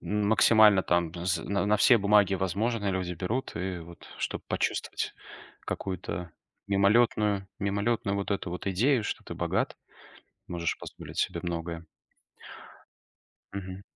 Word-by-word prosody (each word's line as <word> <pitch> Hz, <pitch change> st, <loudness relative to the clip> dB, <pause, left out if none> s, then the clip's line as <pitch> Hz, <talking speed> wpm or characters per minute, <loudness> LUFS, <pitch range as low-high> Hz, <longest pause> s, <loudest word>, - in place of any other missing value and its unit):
Максимально 105 Hz, -1 st, +5 dB
там 85 Hz, -2 st, +1 dB
з 90 Hz, 0 st, -1 dB
на 100 Hz, 0 st, -1 dB
на 105 Hz, +1 st, +4 dB
все 120 Hz, +4 st, +6 dB
бумаги, 100 Hz, -1 st, +4 dB
возможно, 100 Hz, +4 st, -1 dB
люди 90 Hz, -2 st, -2 dB
берут 110 Hz, +9 st, -3 dB
и 90 Hz, 0 st, -3 dB
вот, 85 Hz, 0 st, -12 dB
чтоб -, -, -3 dB
почувствовать -, -, -2 dB, 0.5 s
какую-то 90 Hz, -2 st, -4 dB, 0.4 s
мимолётную, 100 Hz, 0 st, +3 dB
мимолётную 100 Hz, +1 st, 0 dB
вот 100 Hz, +1 st, -3 dB
эту 100 Hz, -3 st, -1 dB
вот 90 Hz, +3 st, -6 dB
идею, 115 Hz, +7 st, +2 dB
что -, -, -4 dB
ты -, -, -7 dB
богат, -, -, -1 dB, 0.7 s
можешь 85 Hz, -1 st, -2 dB
позволить -, -, -10 dB
себе -, -, 0 dB
многое. 85 Hz, -1 st, -4 dB, 1.7 s
Мгм. 95 Hz, -1 st, -6 dB
100 Hz, 125 wpm, -28 LUFS, 90-105 Hz, 1.7 s, все